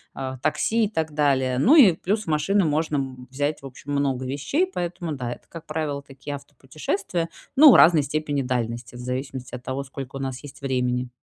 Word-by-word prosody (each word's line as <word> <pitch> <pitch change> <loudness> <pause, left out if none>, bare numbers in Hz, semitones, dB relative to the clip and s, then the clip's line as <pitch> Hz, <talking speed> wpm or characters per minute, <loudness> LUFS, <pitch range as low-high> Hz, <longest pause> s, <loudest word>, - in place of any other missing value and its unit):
э, 130 -1 -4
такси 220 - +1
и - - -3
так 160 -6 -2
далее. 135 -4 +2
Ну 270 - +6
и 225 - +8
плюс 205 +6 -2
машины 165 +5 +2
можно 145 -4 -1
взять, 145 +3 -2
в 140 - -11
общем, 135 +2 -9
много 135 -2 0
вещей, 145 - 0
поэтому 175 - -4
да, 125 -3 -4
это, - - -17
как 165 -1 -10
правило, 155 -2 -3
такие 140 +1 -8
автопутешествия, 155 +6 -4 0.3
но 290 0 +9
в - - +7
разной 165 -2 +7
степени 145 0 -1
дальности, 120 -2 -3
в 120 - -8
зависимости 125 0 -5
от 125 - -6
того, 130 +1 -3
сколько 135 0 -8
у - - -4
нас 135 -1 -4
есть 145 - -11
времени. 125 -2 -1
140 Hz, 190 wpm, -24 LUFS, 130-160 Hz, 0.3 s, но